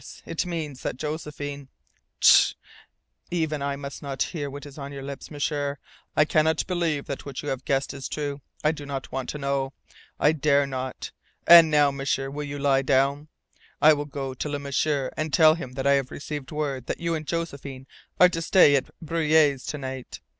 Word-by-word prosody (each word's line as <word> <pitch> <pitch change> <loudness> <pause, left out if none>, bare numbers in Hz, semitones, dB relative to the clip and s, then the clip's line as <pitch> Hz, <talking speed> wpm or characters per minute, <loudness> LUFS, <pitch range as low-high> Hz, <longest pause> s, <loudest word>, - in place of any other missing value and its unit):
It - - -2
means 155 -6 -4
that - - -3
Josephine 145 -2 -5 0.3
" - - -46
"Tsh! - - +7 0.7
Even 160 -4 -1
I 140 0 -1
must 140 0 -7
not 135 -2 -2
hear 145 -5 -4
what 140 +1 -8
is 145 0 -11
on 140 0 -6
your 140 -1 -7
lips, 140 0 -7
M'sieur! 145 -1 -2 0.4
I 150 - +6
cannot 155 +1 +2
believe 170 -6 -1
that 140 - -5 0.2
you 145 - -3
have 130 -1 -4
guessed 135 +1 0 0.2
true. 145 -1 -3 0.2
I 150 - +4
do 145 -3 -8
not 135 -2 -5
want 130 -1 -4
to - - -4
know. 140 -1 -1 0.5
I 150 - +5
dare 145 -2 +2
not. 130 -1 -5 0.3
And 170 -2 +9
now, 145 -2 +4
M'sieur, 135 0 -2
will 145 +1 -4
you 145 0 -5
lie 140 -1 +2
down? 140 +2 +1 0.5
I 155 +1 +7
will 145 0 -2
go 135 -2 -5
to 140 +3 -4
Le 145 - -2
M'sieur 140 -1 -1
and 155 0 -2
tell 155 +3 +6
him 130 -6 -7
I 135 +1 +2
have 135 -2 +2
received 145 -1 -6
word 140 -5 -3
that - - -3
you 170 0 -1
and 155 -2 -4
Josephine 140 -6 -4 0.3
are 180 - +8
to 165 -2 -3
stay 165 -3 +6
at 135 - 0
Breuil's 155 -4 +2
overnight. 130 -3 -6
145 Hz, 190 wpm, -25 LUFS, 135-155 Hz, 0.7 s, And